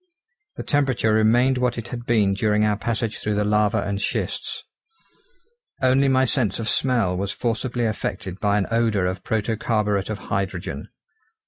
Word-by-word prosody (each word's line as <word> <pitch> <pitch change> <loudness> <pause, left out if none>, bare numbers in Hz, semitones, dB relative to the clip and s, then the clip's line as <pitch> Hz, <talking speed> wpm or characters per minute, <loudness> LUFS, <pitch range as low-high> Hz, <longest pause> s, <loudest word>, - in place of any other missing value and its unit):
The - - -5
temperature 130 -6 +1
remained 120 +4 +3
what 125 -1 0
it 115 - -5
had 120 -1 -7
been 105 -4 +3
during 105 +1 +2
our 105 -1 +2
passage 110 +1 -2
through 105 -1 -1
the 105 - +1
lava 105 0 +2
and 100 0 -3
schists. - - -2 1.2
Only 130 +1 +3
my 130 0 +3
sense 120 -7 0
of 115 - -4
smell 115 -7 +1
was 100 +2 -2
forcibly 120 +1 -2
affected 100 -3 -3
by 105 0 +2
an 100 - +1
odour 115 -5 +2
of 95 0 -3
protocarburet 105 -2 0
of 110 - -2 0.2
hydrogen. 90 -7 -3
110 Hz, 155 wpm, -23 LUFS, 100-120 Hz, 1.2 s, remained